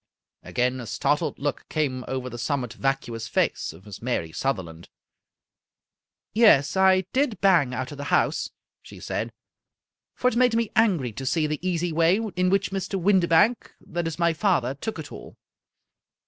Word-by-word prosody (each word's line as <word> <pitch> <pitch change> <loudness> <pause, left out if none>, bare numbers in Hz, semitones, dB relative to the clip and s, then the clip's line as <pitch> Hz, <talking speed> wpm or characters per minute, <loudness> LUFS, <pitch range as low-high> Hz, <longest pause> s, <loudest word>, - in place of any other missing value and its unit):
Again 125 +1 -1
a 120 - -7
startled 145 +7 0
look 145 0 -4
came 135 -5 -1
over 130 -1 -3
the 120 -1 -7
somewhat 125 -1 -2
vacuous 120 -5 -2
face - - 0
of 85 +5 -16
Miss 105 -2 -10
Mary 115 -10 -2
Sutherland. 85 -9 -4 0.7
" - - -67 0.7
Yes, 210 - +5
I 190 0 +5
did 255 -8 +1
bang 165 -10 +3
out 130 +2 -4
of 145 - -9
the 145 - -5
house," - - +1 0.3
she - - -13
said, - - -3 0.4
" - - -66
for 250 - 0
it 250 - +1
made 250 -1 +3
me 230 -1 0
angry 180 - +2
to 135 +5 -7
see 160 +2 +1
the 150 0 -2
easy 175 -1 -1
way 165 +3 +3 0.2
in 180 0 +2
which 195 +1 +1
Mr. 195 0 -3
Windibank 190 +4 +3
— - - -25
^that 170 0 -2
is, 165 - -4
my 170 -1 +2
father 160 - +1
— - - -42
took 220 -4 -4
it 155 -3 -8
all. - - -11
155 Hz, 180 wpm, -25 LUFS, 130-190 Hz, 0.7 s, Yes